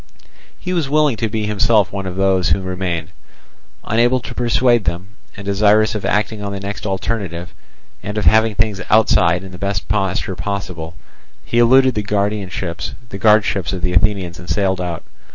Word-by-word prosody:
He 180 - -4
was 165 -6 -1
willing 150 -3 +3
to 115 - -1
be 110 0 -2
himself 105 -2 +2
one 100 -1 -4
of 90 - -5
those 95 -1 +2
who 95 - +2
remained. 90 -2 -3 0.7
Unable 120 +3 +2
to - - -8
persuade 120 -1 +2
them, 85 +3 -3 0.3
and 100 - -8
desirous 105 +2 +3
of 105 - -4
acting 105 +1 0
on 100 - -3
the 100 - -4
next 100 +2 -5
alternative, 95 -3 -3 0.5
and 105 +3 -5
of 105 - -1
having 110 -1 +4
things 105 -3 0
outside 105 -6 +3
in 95 - -10
the 90 - -10
best 100 -1 -2
posture 95 -2 -1
possible, 90 -5 -5 0.5
he 120 - 0
eluded 130 +2 +5
the 105 - -1
guardships 100 0 -1
of 95 - -4
the 90 - 0
Athenians 90 -1 0
and 90 - -11
sailed 95 -2 0
out. 85 -2 -4
100 Hz, 170 wpm, -18 LUFS, 95-110 Hz, 0.7 s, eluded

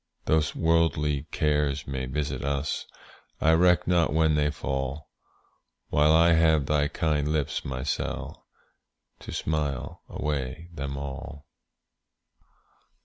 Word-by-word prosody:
Though 80 0 +3
worldly 80 -3 +1
cares 75 -2 0
may 65 -2 -4
visit 75 +3 -3
us, 70 +1 -2 0.5
I 80 - +4
reck 90 +2 +4
not 85 -2 +3
when 80 0 +3
they 75 -1 +2
fall, 65 0 -4 0.8
While 75 +1 +4
I 85 +1 +6
have 80 -3 +4
thy 75 0 +2
kind 75 -1 0
lips, 75 -2 -1
my 65 -1 -4
Sall, 70 - -4 0.7
To - - -9
smile 75 -4 -2
away 75 +3 -3
them 70 -3 -4
all. 70 +1 -7
75 Hz, 115 wpm, -27 LUFS, 70-80 Hz, 0.8 s, I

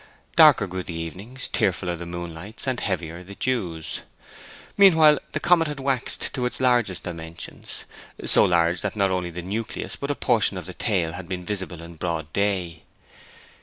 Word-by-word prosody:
Darker - - +7
grew 95 0 -4
the 85 -2 -6
evenings, 95 +11 -5
tearfuller 90 -2 0
the 85 0 -7
moonlights, 85 +6 -6
and 130 -2 0
heavier 85 -2 -3
the 100 +2 -11
dews. 90 -12 -2 0.8
Meanwhile 160 -7 +7
the 155 - 0
comet 170 0 +4
had 150 -2 -5
waxed 135 -2 -1
to 125 -2 0
its - - -4
largest 120 -8 +2
dimensions, 85 -1 -5 0.4
so - - +6
large 85 0 +3
that - - -2
not 100 -2 +2
only 90 -1 -1
the 85 +1 -6
nucleus 110 +5 -4
but 140 - -5
a 145 - 0
portion 110 -7 +2
of 90 - -6
the 90 - -5
tail 90 -8 0
had 90 -1 -7
been 90 -1 -4
visible 95 -5 -4
in 85 0 -11
broad 80 -3 -3
day. 95 -5 0
95 Hz, 170 wpm, -24 LUFS, 85-120 Hz, 0.8 s, Darker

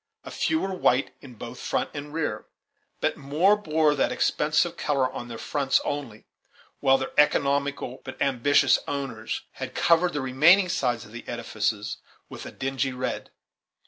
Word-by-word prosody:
A - - -9
few 320 - 0
were 195 -7 -2
white 135 -7 +1
in 130 -4 -12
both 120 +3 -9
front - - -2
and 145 0 -7
rear, 160 0 -3 0.5
but - - 0
more 155 +9 +3
bore 155 -6 +2
that 140 - +1
expensive - - +1
color 140 -3 +1
on 120 - -6
their 115 -1 -7
fronts 140 +2 +1
only, 130 -7 -5 0.5
while 135 -1 +4
their 130 - -4
economical 140 -2 +1
but 130 -1 -9
ambitious 140 +1 +3
owners 135 -6 -4 0.2
had - - -5
covered 170 +1 +3
the 145 - -1
remaining 160 +9 +5
sides 125 -9 -1
of 105 - -15
the 120 +1 -9
edifices 110 -2 -2 0.3
with - - -8
a - - -8
dingy 135 0 -2
red. 125 0 -4
135 Hz, 160 wpm, -26 LUFS, 125-150 Hz, 0.5 s, remaining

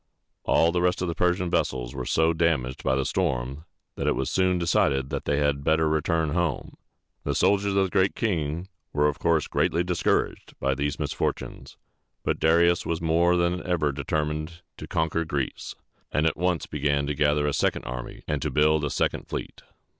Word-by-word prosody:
All 85 - +4
the 90 0 0
rest 90 0 +1
of - - -1
the 85 - -1
Persian 90 +2 +1
vessels - - -1
were 65 -2 -5
so 80 +1 +3
damaged 80 -7 0
by 65 - +2
the 70 0 0
storm, 70 -4 -2 0.3
that - - -2
it - - +2
was - - -2
soon 90 -1 +2
decided 70 -5 +1
that 70 - -3
they 70 - +1
had 70 -1 +1
better 80 +1 +2
return 80 0 +1
home. 85 0 -2 0.5
The 70 - -1
soldiers 100 +3 +2
of 100 - +4
The 95 - -1
Great 95 +1 +2
King 85 -4 -1 0.3
were 75 0 +3
of 75 - -2
course 80 -3 +2
greatly 85 - +1
discouraged 90 -1 -1
by 70 +1 +1
these 70 +1 -2
misfortunes; - - -4 0.5
but - - -1
Darius 85 +2 +4
was 85 -1 -2
more 85 +2 +3
than 85 +1 +1
ever 80 -5 0
determined 75 +4 -3
to - - -8
conquer 80 +1 0
Greece, 70 -5 -4 0.4
and 75 - +1
at 80 - +2
once 90 0 0
began 70 -1 0
to 75 - -1
gather 75 0 +2
a 75 - 0
second - - 0
army 60 0 -7
and 75 -2 -1
to - - -1
build 75 0 +3
a 75 - 0
second - - -1
fleet. - - -6
80 Hz, 190 wpm, -26 LUFS, 70-85 Hz, 0.5 s, All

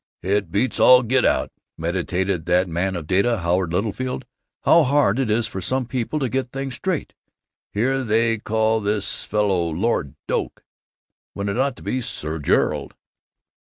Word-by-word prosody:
"It 100 -1 0
beats 115 +6 0
all 125 0 +7
get 130 +3 +2
out," - - +1 0.3
meditated 90 +1 -2
that 90 +1 +3
man 90 +3 -1
of 85 -3 -5
data, 100 +8 +2
Howard 85 0 0
Littlefield, 110 +7 -2 0.4
"how 170 - +6
hard 135 -5 +2
it 130 -4 0
is 110 +2 +2
for 95 -4 -5
some 130 +7 0
people 125 +4 -2
to 135 -3 0
get 130 +1 -1
things 135 +1 -5
straight. 180 +5 -3 0.6
Here 130 +5 0
they 115 0 +2
call 110 +1 +1
this 100 -1 -1
fellow 100 -5 +1
'Lord 80 - -1
Doak' - - -2 0.7
when 100 0 -2
it 100 - -2
ought 135 -1 +1
to - - -14
be 130 - -1
'Sir 80 -8 -4
Gerald. 75 - 0
105 Hz, 160 wpm, -22 LUFS, 95-125 Hz, 0.7 s, all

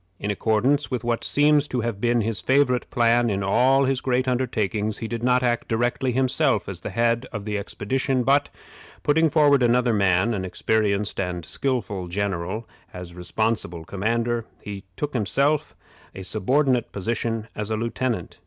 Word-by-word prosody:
In 105 - -2
accordance 120 +8 +1
with 125 -4 -3
what 120 -1 -1
seems 145 0 +3
to 125 -3 -2
have 115 -3 -3
been 120 0 +2
his 110 -3 -2
favorite 130 +2 +2
plan 120 -1 +3
in 100 -1 -1
all 130 +7 +3
his 130 -1 0
great 130 0 0
undertakings, 110 -4 -1
he 115 - -4
did 115 0 -4
not 125 +1 +2
act 120 -1 0
directly 120 +3 0
himself 130 +1 +1
as - - -6
the - - -5
head 115 +2 +1
of 105 -3 -6
the 105 -1 -2
expedition, 130 +6 -1
but, 140 +3 +3 0.5
putting 160 +2 +3
forward 145 -3 +4
another 120 0 +3
man, 100 +2 +2
an 95 -3 -2
experienced 105 +2 0
and 90 -3 -3
skillful 105 -10 -2
general, 95 +3 -3 0.2
as 90 -1 -9
responsible 90 -1 -2
commander, 115 +5 -1 0.2
he 100 -1 -7 0.3
himself 140 +6 0 0.4
took - - -7
a - - -6
subordinate 125 +6 +1
position 115 +2 -2
as 105 0 -3
lieutenant. 115 -2 -2
115 Hz, 160 wpm, -24 LUFS, 100-130 Hz, 0.5 s, forward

